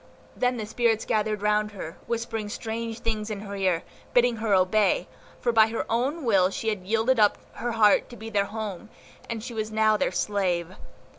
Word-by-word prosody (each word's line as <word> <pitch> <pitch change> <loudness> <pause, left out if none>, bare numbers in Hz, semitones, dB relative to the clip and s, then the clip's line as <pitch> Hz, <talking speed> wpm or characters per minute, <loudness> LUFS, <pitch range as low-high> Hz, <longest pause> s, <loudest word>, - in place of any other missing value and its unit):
Then 250 0 +1
the 220 - -3
spirits 225 0 +1
gathered 215 -1 0
round 210 0 +1
her, 165 -5 -7
whispering 225 -2 -3
strange 225 +1 -4
things 215 -1 -2
in 205 -2 -4
her 200 -1 -6
ear, 185 -4 +1 0.3
bidding 245 -1 +4
her 220 -1 -2
obey, 185 0 +2 0.3
for 240 - +1
by 220 -1 +6
her 225 0 -3
own 265 +7 0
will 195 -5 +4
she 220 +3 -2
had 190 -4 -4
yielded 225 +3 +2
up 210 -1 +4 0.2
her 240 0 -2
heart 215 -2 +4
to 240 - -10
be 225 0 -8
their 200 -2 +2
home, 215 -1 -6 0.4
and 225 -2 -4
she 245 0 -6
was 215 -1 -3
now 215 0 +3
their - - 0
slave. 185 -4 -1
215 Hz, 195 wpm, -26 LUFS, 205-230 Hz, 0.4 s, by